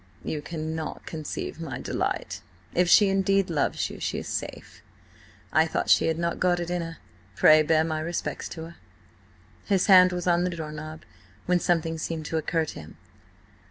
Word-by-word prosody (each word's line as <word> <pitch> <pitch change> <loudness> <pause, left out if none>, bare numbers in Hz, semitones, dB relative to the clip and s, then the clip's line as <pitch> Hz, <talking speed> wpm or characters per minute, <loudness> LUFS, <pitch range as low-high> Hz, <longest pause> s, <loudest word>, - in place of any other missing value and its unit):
"You 150 - -3
cannot 160 0 -5
conceive 160 +1 -5
my 145 -6 -5
delight. - - -3 0.3
If 180 0 +2
she 205 +3 +7
indeed 195 -1 +2
loves 150 -3 0
you, - - -9
she - - -2
is - - -5
safe. - - -6 0.7
I 160 +1 +4
thought - - 0
she - - +5
had 160 0 0
not 170 0 -2
got 180 -1 +2
it 175 0 -4
in 180 -1 -1
her. 165 -1 -6 0.4
Pray 155 +9 +7
bear 155 +1 +3
my 160 -1 -2
respects 170 +2 -4
to 160 - -7
her." 165 +1 -10 0.9
His 195 -3 +2
hand 185 -2 +7
was 180 -1 -3
on 175 -1 +3
the 180 - 0
door 160 -3 -5
knob, 155 +1 -8 0.4
when 180 0 +2
something 165 -2 0
seemed 160 -1 -4
to 160 - -2
occur 160 +1 0
to - - -8
him. 80 +1 -12
165 Hz, 185 wpm, -26 LUFS, 155-175 Hz, 0.9 s, she